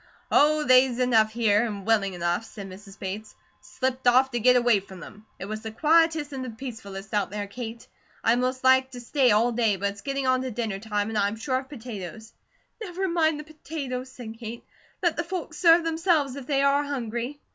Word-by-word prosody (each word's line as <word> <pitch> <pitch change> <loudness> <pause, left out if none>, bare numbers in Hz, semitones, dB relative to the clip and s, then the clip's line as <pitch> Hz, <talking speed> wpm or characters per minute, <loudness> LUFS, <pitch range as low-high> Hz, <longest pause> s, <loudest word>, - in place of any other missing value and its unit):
"Oh, 305 +1 +4
they's 255 -2 +5
enough 230 -4 +3
here, 220 -2 +2
and 205 -4 -4
willing 205 -4 +2
enough," 175 +4 -1
said 200 -3 -9
Mrs. 195 +2 -12
Bates. 205 +3 -6 0.2
"Slipped 260 -1 -3
off 260 +2 +5
to 240 - -1
get 250 +2 +5
away 240 -4 +4
from 190 -1 -12
them. 210 +5 -12
It - - -6
was 215 +2 -5
the 220 - -5
quietest 315 +3 +2
and 265 -1 -4
the 255 - -5
peacefullest 220 -4 -8
out 205 -2 +1
there, 205 +1 -4
Kate. 230 +2 -7 0.4
I'd 235 +2 +3
most 255 +1 -1
liked 260 0 +4
to 245 - -7
stay 255 +2 +2
all 230 +3 +3
day, 225 -3 +2
but 200 +1 -1
it's 200 0 -12
getting 275 -1 -2
on 255 0 +2
to 260 - -3
dinner 220 -4 -3
time, 210 0 -2
and 220 -1 -1
I'm 200 +1 +1
short 260 +3 -2
of - - -28
potatoes." 220 - -8 0.5
"Never 380 -2 -3
mind 320 -3 +1
the - - -6
potatoes," 280 -4 -6
said 225 -3 -9
Kate. 235 0 -7 0.4
"Let 345 -2 +2
the 340 - 0
folks 335 -3 -5
serve 335 -1 +6
themselves 325 -4 +1
if 275 -2 -8
they 275 -1 +2
are 280 +1 +3
hungry." 250 -1 -4
245 Hz, 210 wpm, -26 LUFS, 215-275 Hz, 0.5 s, serve